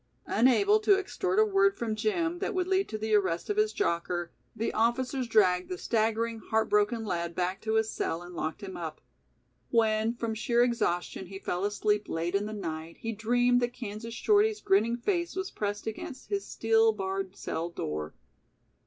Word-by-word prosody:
Unable 395 - +4
to 415 -2 +4
extort 390 -1 -2
a 435 - +6
word 390 -1 +3
from 225 -2 -2
Jim 345 - 0
that 405 - -2
would 365 -1 +1
lead 380 +1 +1
to 215 - -3
the 215 0 -2
arrest 190 - +1
of 415 - -2
his 430 0 +3
jocker, 175 - -1 0.2
the 225 +1 -2
officers 250 +3 0
dragged 185 -5 +3
the 365 - -3
staggering, 225 -1 0
heart 220 0 0
broken 210 +2 +2
lad 170 -3 -2
back 185 +2 -1
to 220 0 -1
his 220 0 +2
cell 165 +2 -2
and 175 0 -10
locked 160 -2 -4
him 190 -1 -6
up. 160 -3 -6 0.7
When 225 0 +2
from 230 -1 -2
sheer 235 +2 +2
exhaustion 190 -6 -1
he 195 +1 -8
fell 180 -1 -3
asleep 210 0 0
late 170 +2 -2
in 200 +1 +1
the - - -5
night, 165 -5 -5
he 230 - -2
dreamed 245 +3 +2
that 240 0 -1
Kansas 230 -1 -6
Shorty's 425 - +3
grinning 220 - +2
face 345 +7 -1
was 380 0 -3
pressed 205 0 -3
against 265 - -7
his 400 -1 -1
steel 225 0 +3
barred 195 -1 -3
cell 170 -2 -3
door. 75 - -4
220 Hz, 185 wpm, -29 LUFS, 195-260 Hz, 0.7 s, a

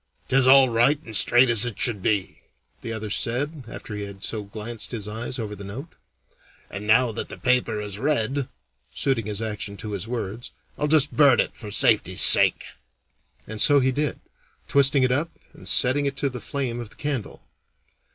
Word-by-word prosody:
"'Tis 130 -1 +3
all 135 0 +7
right 120 +5 +2
and 110 - -8
straight 120 +5 +6
as 115 -3 +5
it 120 -4 -2
should 115 -6 +2
be," 100 -1 -2 0.4
the 115 - -7
other 110 -2 -6
said, 135 +6 -2
after 115 -2 -9
he 105 - -6
had 100 -1 -9
so 110 - -4
glanced 110 +3 -7
his 110 -4 -6
eyes 115 +4 -6
over 105 -3 -6
the 100 - -11
note. 125 - -9 0.8
"And 105 +2 -8
now 115 +2 +3
that - - -6
the - - -9
paper 125 -4 0
is 105 -1 -6
read" 140 -1 -1 0.5
(suiting 125 -6 -1
his 105 +1 -4
action 105 -2 -5
to 105 - -7
his 100 +1 -5
words), 115 -1 -6 0.3
"I'll 150 - -2
just 150 -1 +1
burn 140 -5 +4
it, - - -1
for 105 - -10
safety's 100 -3 +3
sake." - - +7 0.8
And 110 0 -5
so 145 -1 +5
he 130 0 +1
did, 145 +3 -3 0.5
twisting 140 0 +3
it 130 - +1
up 145 +6 -1 0.2
and - - -8
setting 140 +2 +3
it 140 0 -5
to 140 0 -1
the 125 -1 -8
flame 125 -2 -5
of 120 -3 -8
the - - -18
candle. 140 -7 -6
120 Hz, 190 wpm, -23 LUFS, 105-135 Hz, 0.8 s, all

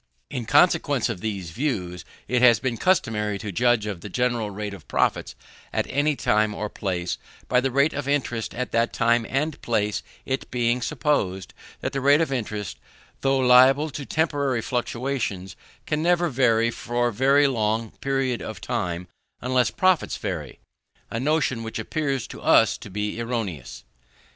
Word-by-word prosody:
In 125 -4 -3
consequence 145 -6 +3
of 100 -6 -4
these 100 -6 -4
views, 90 - -3 0.2
it 125 +2 +1
has 120 -4 +6
been 120 0 -1
customary 105 - +1
to 105 -1 -5
judge 120 +2 +2
of 100 -5 -5
the 105 - -7
general 120 -1 0
rate 105 0 -5
of 100 - -12
profits - - 0 0.4
at - - 0
any 145 +2 +2
time 105 -4 +1
or 105 - -3
place, 90 -4 -3 0.3
by 125 0 +3
the 135 - 0
rate 140 +5 +2
of 145 -1 -4
interest 130 -5 -1
at 125 - -3
that 115 +1 +1
time 115 0 +2
and 150 +3 -1
place: 105 -3 0 0.2
it 130 0 -3
being 120 0 0
supposed 95 - -1 0.3
that - - -3
the 135 - -1
rate 140 +2 +5
of 160 -4 0
interest, 105 -6 -4 0.4
though 135 0 +2
liable 130 +4 +5
to 140 - -5
temporary 140 -6 0
fluctuations, 120 -7 -3 0.3
can 150 0 -1
never 175 +1 +2
vary 115 -3 +2
for 120 0 -1 0.2
any 145 - +6
long 110 -3 0
period 135 -3 0
of - - -6
time 90 0 -3 0.3
unless 125 -1 +1
profits 185 -2 +1
vary; - - -5 0.5
a 115 - -2
notion 135 -3 +1
which 115 0 -5
appears 135 +2 -2
to - - -10
us - - +5
to - - -10
be 105 +3 -3
erroneous. 110 - -4
120 Hz, 165 wpm, -24 LUFS, 105-135 Hz, 0.5 s, has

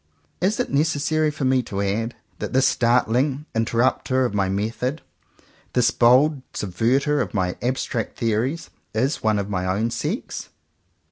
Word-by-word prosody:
Is 195 +3 +1
it - - -1
necessary 155 +1 +1
for 150 -2 -3
me 130 0 +3
to 100 -4 -5
add 105 +4 -1 0.2
that - - -4
this 130 +1 +4
startling 125 +4 +2
interrupter 125 +3 +1
of 120 - -2
my 100 -2 +1
method, 115 +9 -2 0.7
this 125 -2 +3
bold 130 +4 +4
subverter 130 +10 +1
of 125 - -4
my 90 -2 0
abstract 125 -2 -2
theories, 120 +9 -1 0.2
is 130 +7 0
one 110 -1 +2
of 100 -1 -2
my 90 -3 -2
own 105 +5 0
sex 155 - -4
125 Hz, 145 wpm, -23 LUFS, 110-140 Hz, 0.7 s, this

